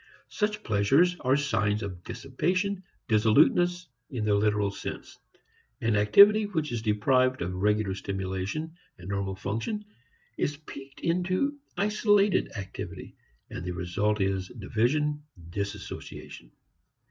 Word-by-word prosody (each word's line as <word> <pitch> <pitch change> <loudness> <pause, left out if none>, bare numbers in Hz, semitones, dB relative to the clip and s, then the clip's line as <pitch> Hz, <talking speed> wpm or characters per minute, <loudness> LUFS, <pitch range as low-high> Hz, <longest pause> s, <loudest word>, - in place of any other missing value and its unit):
Such 210 0 -1
pleasures 135 - +3
are 130 0 +2
signs 110 -6 0
of 90 -3 -6
dissipation, 185 - -1 0.3
dissoluteness, 165 +11 +3 0.2
in 120 -5 -3
the 105 - +3
literal 105 -1 +2
sense. - - -7 0.6
An 115 -1 +1
activity 200 - +7
which 160 -8 -2
is 120 -2 -2
deprived 130 +4 +2
of 90 +1 -3
regular 105 +1 +1
stimulation 95 +11 -4 0.2
and 90 +1 -10
normal 100 -1 -2
function 115 - -3 0.5
is 145 0 0
piqued 140 -2 -11
into 185 +12 0 0.2
isolated 205 0 +3
activity, 95 -1 -7 0.4
and - - -5
the 90 0 -3
result 90 +5 -1
is 95 -1 0
division, 125 +9 0 0.3
disassociation. 100 -10 -6
110 Hz, 115 wpm, -28 LUFS, 100-170 Hz, 0.6 s, activity